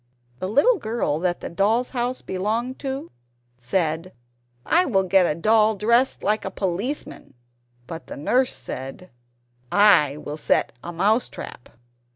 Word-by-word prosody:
The 185 - -3
little 380 - +4
girl 220 -9 -1
that 175 0 -1
the - - -5
doll's 215 +8 +1
house 250 0 -2
belonged 225 +7 -2
to, 270 - -5 0.5
said, 160 +6 -1 0.5
"I 350 +2 +4
will 195 - +1
get 185 -1 +4
a 150 - 0
doll 215 +3 +4
dressed 235 +6 +2
like 210 +1 +1
a - - -3
policeman!" 195 - -4 0.5
But 165 +5 -8
the - - -8
nurse 250 - +2
said, 135 +8 -8 0.6
"I 200 -9 +5
will 150 0 -6
set - - +1
a 175 - -5
mouse 205 +8 +1
trap!" 120 - -9
205 Hz, 145 wpm, -23 LUFS, 170-240 Hz, 0.6 s, I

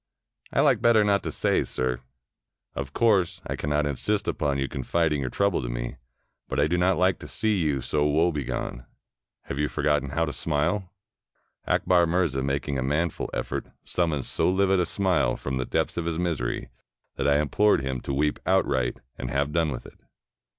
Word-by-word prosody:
"I - - +3
like - - +3
better 115 -2 +5
not 100 -1 +2
to - - -4
say, - - +1
sir." 65 -1 -2 0.7
"Of 70 -1 -5
course, 100 -3 +2
I - - -3
cannot 75 +1 0
insist 85 - -1
upon 70 -1 0
your 70 0 -1
confiding 75 +2 0
your 65 - -2
trouble 100 0 +1
to - - -4
me. - - -4 0.5
But 65 - -1
I 70 - +4
do 80 +3 +1
not 90 +1 +2
like 95 +1 +2
to - - -9
see 110 -3 0
you 75 -5 0
so 75 +4 +1
woebegone. 75 -6 -1 0.6
Have 70 - -5
you 75 - +2
forgotten 75 -2 0
how 80 +4 0
to 75 - -4
smile?" 85 +5 -1 0.8
Akbar 90 -2 +3
Mirza, 80 -6 +1
making 70 0 -1
a - - -1
manful 75 +5 -1
effort, - - -3 0.2
summoned 80 -7 -1
so - - +1
livid 95 0 +3
a 90 - +1
smile 90 -11 +1
from 65 -1 -3
the 65 - -1
depths - - -1
of 85 - -1
his 85 -1 -1
misery, 85 -9 -2 0.5
that - - 0
I 70 0 +4
im 75 -1 0
plored 105 -6 +3
him 65 -2 -3
to - - -4
weep 75 +2 0
outright 65 -2 +1 0.2
and 65 - -4
have 70 +2 0
done 80 0 +1
w^th 65 - -5
it. - - -14
75 Hz, 190 wpm, -26 LUFS, 70-90 Hz, 0.8 s, better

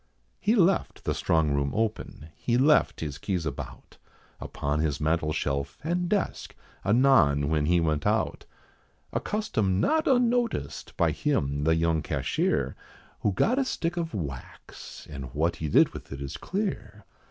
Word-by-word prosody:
He 215 +3 +2
left 195 -2 +2
the - - 0
strong 80 -2 +1
room 70 -1 0
open; 110 -8 -3
he 120 0 0
left 150 +4 +3
his 75 -3 -4
keys 90 -5 -2
about, 70 -3 -7 0.4
Upon 75 +1 -3
his 75 -2 0
mantle 80 0 +1
shelf, 70 -2 -2
and 175 +2 -1
desk, 205 -1 -2 0.3
anon 100 - +4
when 75 -2 +1
he 90 +1 +4
went 75 -3 0
out - - 0 0.7
A - - +1
custom 110 - -1
not 315 - +2
unnoticed 245 -2 0
by - - +3
him, 70 - -1
the 80 0 +4
young 80 -1 +1
cashier, - - -1 0.4
Who 105 - +1
got 235 - +2
a - - +3
stick 175 -9 -2
of 165 -7 -3
wax, 70 -9 -8
and 70 -3 -7
what 85 +2 +1
he 80 - -3
did - - +5
with - - -11
it 70 - -6
is 70 -1 -5
clear. 200 +2 -4
85 Hz, 155 wpm, -27 LUFS, -, 0.7 s, did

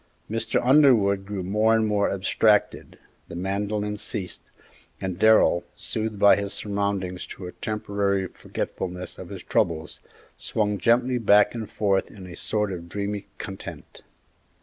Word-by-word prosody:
Mr. 115 0 +1
Underwood 115 -9 +5
grew 100 -2 -4
more 105 +4 +3
and 110 -1 +2
more 105 -1 +1
abstracted, 100 +2 +1 0.3
the - - -9
mandolin 105 +3 -2
ceased, 105 -3 -4 0.5
and 95 -1 -4
Darrell, 110 -5 +5
soothed 110 -1 -3
by 100 0 +7
his 100 0 -3
surroundings 100 -3 -2
to 95 - -9
a 90 - -6
temporary 100 -2 -1
forgetfulness 90 0 -5
of - - -8
his - - -8
troubles, 80 -2 -1 0.4
swung 105 -2 -1
gently 125 +2 +2
back 105 -2 +5
and 115 -3 -5
forth 100 -2 +1
in 95 -3 -11
a 90 -1 -9
sort 105 -2 -1
of 85 -1 -8
dreamy 100 +1 -4
content. 95 -3 -8
100 Hz, 140 wpm, -25 LUFS, 95-110 Hz, 0.5 s, by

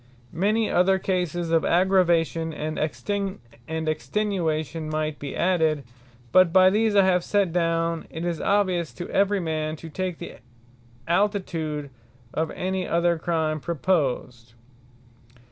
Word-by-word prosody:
Many 210 +6 +1
other 190 +2 +3
cases 175 -3 -2
of 165 -1 +3
Aggravation, 170 -3 +2
and 155 +1 -4
Extenuation 160 - -3
might 155 -1 -2
be 140 -1 -6
added: 160 -5 +1 0.5
but 185 +1 +6
by 185 +1 +6
these 215 +1 +2
I 200 -1 +6
have 180 -2 +2
set 200 -4 +1
down, 165 -1 0
it 160 +2 -5
is 170 -2 -2
obvious 185 -5 +1
to 175 - -6
every 200 +1 +2
man, 155 -2 -2
to 160 +1 -10
take 185 +1 -3
the - - -9 0.7
altitude 170 -6 -1 0.4
of 160 0 -1
any 185 0 -2
other 170 0 +1
Crime 160 -2 -1
proposed. 130 -8 -1
170 Hz, 125 wpm, -25 LUFS, 155-185 Hz, 0.7 s, but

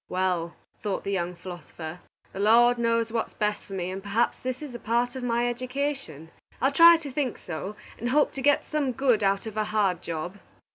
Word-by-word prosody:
"Well," 180 -2 -1 0.3
thought 205 -3 -2
the 200 - -3
young 180 -2 -1
philosopher, 175 -2 -8 0.3
"the - - -6
Lord 235 +4 +5
knows 230 -1 +1
what 230 -1 -1
is - - -23
best 210 -1 -1
for 195 - -10
me, 185 -1 -3
and 190 +1 -5
perhaps 205 +4 0
this 255 +3 -4
is 285 -4 -7
a 240 - -6
part 240 +3 0
of 260 - -4
my 240 0 +1
education. 250 - -3 0.3
I'll 270 - +3
try 335 +3 +8
to 300 -4 -8
think 260 -2 -1
so, 185 +5 -6 0.2
and 240 - -2
hope 295 +3 +3
to 270 - -6
get 290 +2 +3
some 290 -4 -1
good 245 -3 +2
out 195 +1 +1
of 220 -1 -7
a 215 - +1
hard 200 -5 +1
job." 170 +4 -5
225 Hz, 210 wpm, -27 LUFS, 185-255 Hz, 0.3 s, try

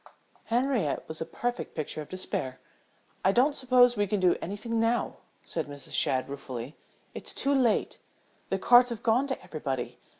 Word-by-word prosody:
Henriette 240 - 0
was 160 0 -5
a - - -1
perfect 245 0 -4
picture 155 0 -3
of 150 - -10
despair. 130 -8 -3 0.6
"I 190 - +5
don't 255 +8 +3
suppose 250 -2 +4
we 205 -1 +1
can 205 +1 0
do 180 -2 +4
anything 220 +5 -3
now," 230 +1 0 0.3
said 160 -3 -3
Mrs. 145 -2 -8
Shadd, 130 -1 +2
ruefully. 135 -1 -7 0.4
"It's - - -4
too 280 - +1
late. 250 -5 +1 0.5
The - - 0
cards 245 0 +6
have 235 -2 -5
gone 245 +3 +3
to 265 - -3
everybody. 135 -5 -4
210 Hz, 165 wpm, -28 LUFS, 155-245 Hz, 0.6 s, cards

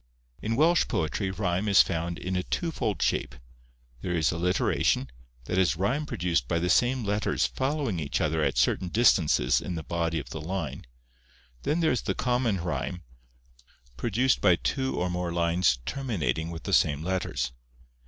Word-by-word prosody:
In 115 +1 -1
Welsh 165 +6 +4
poetry 85 +5 -1
rhyme 95 0 -1
is 100 -1 +7
found 85 -1 -3
in 95 +1 -3
a 90 - +1
twofold 110 - -2
shape: - - 0 0.7
there 90 -1 -2
is 80 -2 +2
alliteration, 85 -6 +1 0.3
that 90 - 0
is 90 -2 +3
rhyme 125 - -1
produced 90 - -1
by 85 - 0
the 90 +2 +1
same 125 0 +2
letters 105 +1 0
following 135 - -1
each 75 -3 -2
other 80 +1 0
at - - 0
certain 95 - +2
distances 85 - +3
in 90 - -4
the 80 - -4
body 85 0 -1
of 75 - -6
the 80 - -5
line, 80 -7 -4 0.7
then 155 +4 0
there 160 - +3
is 125 - 0
the - - -2
common 125 -5 +1
rhyme, 85 +2 -3 0.9
produced 120 - +1
by 90 - +5
two 130 - -2
or 90 - 0
more 90 -1 -2
lines 85 -4 +2
terminating 85 - -2
with 80 -2 -7
the - - -3
same 75 +1 +3
letters. 90 -9 -2
90 Hz, 165 wpm, -27 LUFS, 85-115 Hz, 0.9 s, is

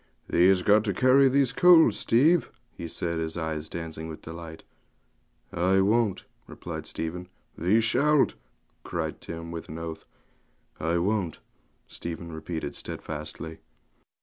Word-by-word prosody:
'Thee 90 +2 +5
has 95 -1 +4
got 105 +2 +5
to 100 -4 -2
carry 130 +3 +5
these 135 -2 +2
coals, 175 -2 +6
Steve,' 155 +9 +3 0.2
he 85 - -7
said, 85 0 -3
his 80 +1 -3
eyes 80 -1 -3
dancing 80 -1 -6
with 80 -1 -9
delight. 80 0 -9 0.9
'I 95 +2 +3
won't,' 105 0 +1 0.2
replied - - -7
Stephen. 90 +2 -4 0.3
'Thee 95 +7 +3
shalt,' 145 +6 +3 0.5
cried - - -4
Tim, 85 0 -7
with 85 -1 -7
an 80 - -6
oath. 80 -1 -6 0.7
'I 85 +2 0
won't,' 95 -2 -1 0.5
Stephen 85 0 -7
repeated 80 +1 -5
stedfastly. 80 +1 -6
85 Hz, 130 wpm, -27 LUFS, 80-110 Hz, 0.9 s, coals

